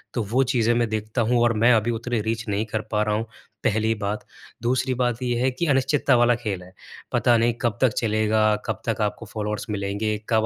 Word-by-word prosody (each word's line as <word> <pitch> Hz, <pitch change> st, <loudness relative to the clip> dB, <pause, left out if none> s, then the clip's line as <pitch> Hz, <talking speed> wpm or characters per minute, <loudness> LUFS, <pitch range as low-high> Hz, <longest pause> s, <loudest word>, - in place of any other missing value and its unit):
तो 120 Hz, -, 0 dB
वो 130 Hz, +3 st, +4 dB
चीज़ें 120 Hz, -1 st, +3 dB
मैं 120 Hz, -1 st, +1 dB
देखता 110 Hz, +2 st, -2 dB
हूँ 120 Hz, -1 st, +3 dB
और 120 Hz, -1 st, +3 dB
मैं 125 Hz, +1 st, +7 dB
अभी 115 Hz, +1 st, +2 dB
उतनी 115 Hz, 0 st, -2 dB
रीच 115 Hz, +1 st, -3 dB
नहीं 105 Hz, +2 st, 0 dB
कर 110 Hz, 0 st, -2 dB
पा 105 Hz, 0 st, +2 dB
रहा 105 Hz, 0 st, 0 dB
हूँ 110 Hz, +1 st, -2 dB, 0.4 s
पहली 110 Hz, +1 st, +2 dB
बात। 105 Hz, 0 st, -4 dB, 0.4 s
दूसरी 130 Hz, +2 st, 0 dB
बात 125 Hz, -1 st, -1 dB
ये 120 Hz, -1 st, 0 dB
है 130 Hz, -, +3 dB
कि 130 Hz, +7 st, -2 dB
अनिश्चितता 135 Hz, 0 st, +3 dB
वाला 120 Hz, 0 st, +4 dB
खेल 105 Hz, -6 st, -4 dB
है। 90 Hz, +1 st, -15 dB, 0.4 s
पता 120 Hz, -, +3 dB
नहीं 115 Hz, +1 st, +2 dB
कब 120 Hz, -3 st, 0 dB
तक 130 Hz, -4 st, +4 dB
चलेगा? 110 Hz, -1 st, +2 dB
कब -, -, -3 dB
तक 115 Hz, -1 st, 0 dB
आपको 105 Hz, +2 st, -2 dB
फ़ॉलोअर्स 105 Hz, 0 st, -4 dB
मिलेंगे? 105 Hz, +1 st, -2 dB
कब 110 Hz, -1 st, +3 dB
115 Hz, 220 wpm, -24 LUFS, 105-120 Hz, 0.4 s, मैं